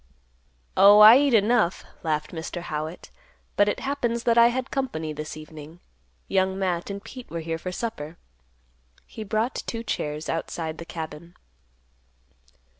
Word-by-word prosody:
"Oh, 200 Hz, +1 st, +8 dB
I 215 Hz, +2 st, +11 dB
eat 280 Hz, -4 st, +3 dB
enough," 215 Hz, -3 st, +2 dB, 0.2 s
laughed 155 Hz, -2 st, -2 dB
Mr. 170 Hz, +1 st, -6 dB
Howitt; 155 Hz, +1 st, -5 dB, 0.4 s
"but 205 Hz, 0 st, +4 dB
it -, -, -3 dB
happens 240 Hz, -4 st, -1 dB
that 235 Hz, -1 st, +3 dB
I 235 Hz, 0 st, +7 dB
had 255 Hz, +2 st, -2 dB
company 160 Hz, -, -3 dB
this 155 Hz, +1 st, -6 dB
evening. 155 Hz, +1 st, -11 dB, 0.5 s
Young 190 Hz, 0 st, +1 dB
Matt 180 Hz, -2 st, -1 dB
and 200 Hz, 0 st, -6 dB
Pete 250 Hz, +2 st, -10 dB
were 170 Hz, -, -4 dB
here 165 Hz, 0 st, -4 dB
for 185 Hz, -, -5 dB
supper." 175 Hz, -7 st, -5 dB, 0.9 s
He 220 Hz, -, -8 dB
brought 220 Hz, +4 st, -1 dB
two 230 Hz, -1 st, -4 dB
chairs 150 Hz, -8 st, -3 dB
outside 165 Hz, -1 st, -4 dB
the 170 Hz, -, -7 dB
cabin. 165 Hz, +1 st, -8 dB
185 Hz, 145 wpm, -25 LUFS, 160-230 Hz, 0.9 s, I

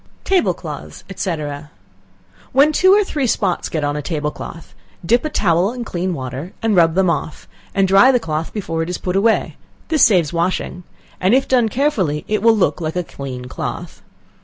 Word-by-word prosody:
Table 380 Hz, -2 st, +2 dB
Cloths, -, -, -8 dB
&c. 180 Hz, -2 st, -1 dB, 1.2 s
When 280 Hz, +4 st, +5 dB
two 375 Hz, +5 st, +4 dB
or 415 Hz, +1 st, +5 dB
three 290 Hz, -8 st, -2 dB
spots 190 Hz, -5 st, 0 dB
get 155 Hz, -2 st, -2 dB
on 145 Hz, 0 st, -1 dB
a 150 Hz, -, -2 dB
table 150 Hz, -1 st, -2 dB
cloth, 165 Hz, -10 st, -10 dB, 0.3 s
dip 240 Hz, +7 st, +3 dB
a 310 Hz, -, -2 dB
towel 180 Hz, -, +2 dB
in 245 Hz, -2 st, -5 dB
clean 180 Hz, -2 st, -2 dB
water 130 Hz, +5 st, -6 dB
and 225 Hz, -2 st, +2 dB
rub 165 Hz, -2 st, +4 dB
them 190 Hz, 0 st, +3 dB
off, 155 Hz, -2 st, -3 dB, 0.3 s
and 195 Hz, -1 st, +3 dB
dry 195 Hz, +8 st, +6 dB
the 250 Hz, -, +2 dB
cloth 160 Hz, -4 st, -3 dB
before 165 Hz, -6 st, -3 dB
it 165 Hz, -, -3 dB
is 180 Hz, -, -2 dB
put 180 Hz, 0 st, -3 dB
away, 220 Hz, +3 st, +1 dB, 0.3 s
this 315 Hz, -4 st, +3 dB
saves 175 Hz, -8 st, +4 dB
washing, 175 Hz, +1 st, -1 dB, 0.4 s
and 190 Hz, +6 st, +3 dB
if 270 Hz, -, +2 dB
done 245 Hz, -4 st, +3 dB
carefully 205 Hz, -, 0 dB
it 215 Hz, -, 0 dB
will 225 Hz, 0 st, +4 dB
look 185 Hz, -, +1 dB
like 160 Hz, 0 st, -3 dB
a 180 Hz, -, 0 dB
clean 130 Hz, -5 st, -7 dB
cloth. 125 Hz, -, -6 dB
185 Hz, 190 wpm, -19 LUFS, 160-230 Hz, 1.2 s, dry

